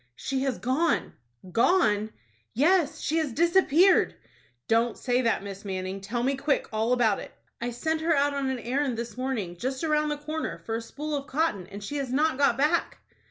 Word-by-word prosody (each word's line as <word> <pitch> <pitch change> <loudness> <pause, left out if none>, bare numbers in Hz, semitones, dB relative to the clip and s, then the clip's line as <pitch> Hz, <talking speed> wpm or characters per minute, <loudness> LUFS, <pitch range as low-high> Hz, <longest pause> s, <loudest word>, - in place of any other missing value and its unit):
"She 265 - -2
has 265 -3 -1
gone." 255 - 0 0.4
"Gone!" 220 - +3 0.5
"Yes, 320 - +3
she 320 - 0
has 310 -4 -1
disappeared." 345 +4 +4 0.5
"Don't 230 +1 +2
say 250 -1 +1
that, 230 -5 +1
Miss 195 0 -8
Manning. 190 0 -4
Tell 235 +5 -3
me 275 +2 +1
quick 280 +1 0
all 220 +2 0
about 235 -5 +3
it." - - -9 0.3
"I 240 - -1
sent 315 +7 -2
her 330 0 +2
out 285 0 +2
on 275 -1 -1
an 260 - -1
errand 250 +1 -1
this 235 0 -5
morning, 240 -9 -3
just 260 - -3
around 305 -1 +1
the 295 - -2
corner, 305 - -4
for 225 - -3
a 225 - -1
spool 295 +6 -5
of 280 0 -4
cotton, 275 - -1
and 200 +1 -9
she 290 +8 -4
has 270 -3 -3
not 290 +1 +1
got 280 - +3
back." 300 +5 +1
265 Hz, 195 wpm, -27 LUFS, 225-300 Hz, 0.5 s, disappeared